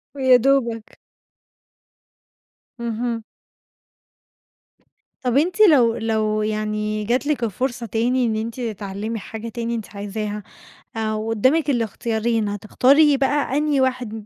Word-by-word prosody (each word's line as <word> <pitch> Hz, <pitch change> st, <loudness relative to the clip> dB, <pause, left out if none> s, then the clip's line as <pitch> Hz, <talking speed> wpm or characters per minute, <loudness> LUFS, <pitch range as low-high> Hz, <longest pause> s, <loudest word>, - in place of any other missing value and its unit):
ويا 260 Hz, -2 st, +5 dB
دوبك. 235 Hz, -4 st, 0 dB, 1.8 s
اهم. 235 Hz, 0 st, -3 dB, 2.0 s
طَب 250 Hz, 0 st, +1 dB
أنتِ 350 Hz, +7 st, +1 dB
لو 260 Hz, -, +6 dB
لو 215 Hz, -1 st, 0 dB
يعني 215 Hz, 0 st, -2 dB
جات 250 Hz, +6 st, 0 dB
لِك 295 Hz, -5 st, 0 dB
الفرصة 240 Hz, +3 st, -2 dB
تاني 245 Hz, +3 st, +1 dB
إن 220 Hz, -2 st, 0 dB
أنتِ 225 Hz, +3 st, -4 dB
تتعلِّمي 215 Hz, 0 st, -4 dB
حاجة 225 Hz, +3 st, -7 dB
تاني 235 Hz, +1 st, -3 dB
أنتِ 220 Hz, -2 st, -7 dB
عايزاها 205 Hz, +1 st, -4 dB, 0.5 s
آآ 220 Hz, -1 st, -1 dB
وقُدّامك 225 Hz, +8 st, +1 dB
الاختيارين، 225 Hz, -2 st, -1 dB
هتختاري 275 Hz, +8 st, +3 dB
بقى 280 Hz, 0 st, +1 dB
أنهي 295 Hz, -2 st, +1 dB
واحد 245 Hz, -5 st, -2 dB
230 Hz, 110 wpm, -21 LUFS, 215-260 Hz, 2.0 s, لو